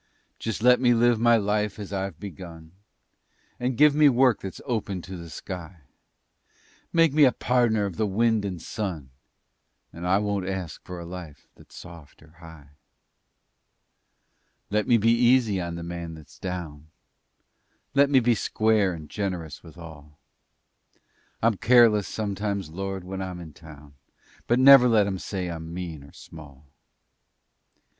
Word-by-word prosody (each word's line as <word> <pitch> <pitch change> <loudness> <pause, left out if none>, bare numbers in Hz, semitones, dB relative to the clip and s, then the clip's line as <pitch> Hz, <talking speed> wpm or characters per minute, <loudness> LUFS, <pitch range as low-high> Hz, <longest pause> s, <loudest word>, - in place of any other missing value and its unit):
Just 110 -1 -4
let 125 0 +6
me 120 -2 +4
live 120 0 +3
my 120 0 +4
life 105 0 -1
as 100 -1 -8
I've 95 -4 -4
begun 85 -4 -10 0.9
And 125 -1 -2
give 150 +1 +6
me 150 0 +5
work 125 -2 +3
that's 95 - -7
open 105 -8 -3
to 95 +3 -8
the 85 -1 -9
sky; 90 -1 -8 1.1
Make 165 -3 +3
me 150 0 +5
a 130 - +6
pardner 120 -5 +1
of 95 -4 -6
the 110 - 0
wind 110 +2 +1
and 95 -4 -4
sun, 85 -7 -5 0.8
And 85 +2 -6
I 95 +2 +3
won't 100 -2 -2
ask 95 -3 -6
a - - -6
life 85 -4 -10
that's - - -19
soft 85 -4 -13
or 80 - -20
high. 80 -4 -14 2.0
Let 105 0 0
me 120 - +5
be 115 +1 +3
easy 120 -4 +3
on 85 -1 -5
the 85 - -7
man 85 -1 -6
that's 80 -2 -16
down; 80 -5 -6 1.1
Let 140 0 +4
me 135 -2 +5
be 120 0 +2
square 110 -3 +1
and 80 -3 -9
generous 90 -4 -5
with 85 0 -15
all. 75 -3 -13 1.3
I'm 110 -3 +2
careless 115 -4 +4
sometimes, 100 -4 -3
Lord, 95 +1 -5
when 95 +1 -6
I'm 90 -2 -6
in 80 -3 -10
town, 75 -2 -15 0.5
But 120 - +2
never 130 -1 +8
let 110 -3 +4
'em 95 -2 -3
say 95 -2 -4
I'm 80 -1 -7
mean 85 -4 -6
or 70 - -15
small! 75 -3 -14
95 Hz, 150 wpm, -25 LUFS, 85-115 Hz, 2.0 s, never